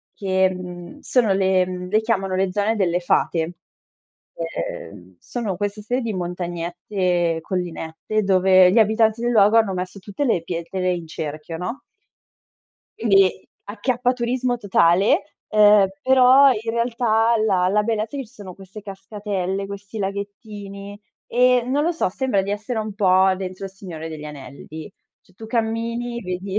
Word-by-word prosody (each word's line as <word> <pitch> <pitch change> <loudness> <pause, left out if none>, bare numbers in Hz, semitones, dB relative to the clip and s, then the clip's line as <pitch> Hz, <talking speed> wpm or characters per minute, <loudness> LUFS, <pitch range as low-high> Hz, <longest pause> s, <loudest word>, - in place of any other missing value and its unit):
che, 190 -1 +2
mhmm, 180 +7 -8
sono 230 -6 +2
le 190 -1 +2
mhmm, 180 0 -6
le 215 +3 +2
chiamano 195 -4 -1
"Le 190 0 0
zone 205 +3 0
delle 180 -3 +1
fate". 170 -1 0 0.8
Ehm, 95 - -6
sono 215 -7 -4
questa 205 +1 -3
serie 245 +4 -1
di 230 -2 -2
montagnette, 175 0 -2
collinette 180 +3 -3
dove 185 -1 +5
gli - - +4
abitanti 220 +1 +3
del 240 0 +1
luogo 210 0 +5
hanno 210 -4 +2
messo 185 +2 -5
tutte 205 +9 -4
le 200 -10 +1
pietre 180 +2 -2
in 170 -2 -5
cerchio, 155 +1 -6
no 180 +9 -5 1.2
quindi 195 -4 +3 0.2
acchiappaturismo 245 +3 -1
totale, 190 -3 +2
uhm, 210 -2 +6
però 260 +1 +6
in 225 -1 -3
realtà 235 -1 +1
la 185 -4 +2
la 210 +2 +2
bellezza 220 +3 -2
è - - -4
che 260 - -7
ci 220 - -24
sono 195 -6 -10
queste 195 +2 -12
cascatelle, 195 -1 -4
questi 200 +2 -8
laghettini 200 0 -6 0.3
e, 250 0 +3
non 280 +3 +1
lo 335 - +2
so, 330 - 0
sembra 210 -2 0
di 200 - -4
essere 215 +3 -3
un 215 -2 -4
po' 190 -1 +4
dentro 185 0 -6
Il 195 - -6
Signore 170 -5 -8
degli 155 -1 -8
Anelli. 150 +4 -9 0.3
Cioè, 185 - -27
tu 220 +3 -10
cammini, 230 +1 -2
vedi 190 +2 -3
200 Hz, 150 wpm, -22 LUFS, 180-225 Hz, 1.2 s, uhm